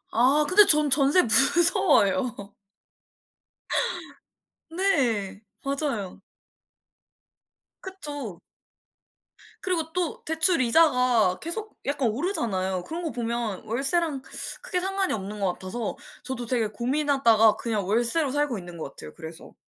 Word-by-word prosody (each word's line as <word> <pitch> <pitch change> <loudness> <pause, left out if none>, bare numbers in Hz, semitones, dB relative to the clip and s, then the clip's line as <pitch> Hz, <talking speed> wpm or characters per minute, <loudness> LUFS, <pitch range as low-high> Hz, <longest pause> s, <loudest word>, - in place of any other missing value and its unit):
아. 265 +6 +2
근데 410 +2 +6
전 300 -3 +5
전세 280 +6 +3
무서워요. 280 - +5 2.3
네. 250 - -1 0.2
맞아요. 275 -9 -4 1.6
그쵸. 290 - -7 1.2
그리고 330 -4 -3
또 360 -3 -4
대출 320 0 +3
이자가 250 - +2
계속 420 +7 -4
약간 275 -4 -1
오르잖아요. 205 - -3
그런 330 - -7
거 325 - -4
보면 235 -4 -5
월세랑 275 +5 -1 0.4
크게 365 - -3
상관이 385 +1 -2
없는 210 0 -7
것 190 -3 -1
같아서 205 +5 -6 0.3
저도 250 -2 -5
되게 230 -2 -1
고민하다가 235 -2 +1
그냥 215 -4 -4
월세로 240 +7 +1
살고 290 -4 -2
있는 175 -2 -11
것 155 -4 -8
같아요, 155 - -10
그래서. 160 0 -12
260 Hz, 240 characters per minute, -24 LUFS, 215-320 Hz, 2.3 s, 근데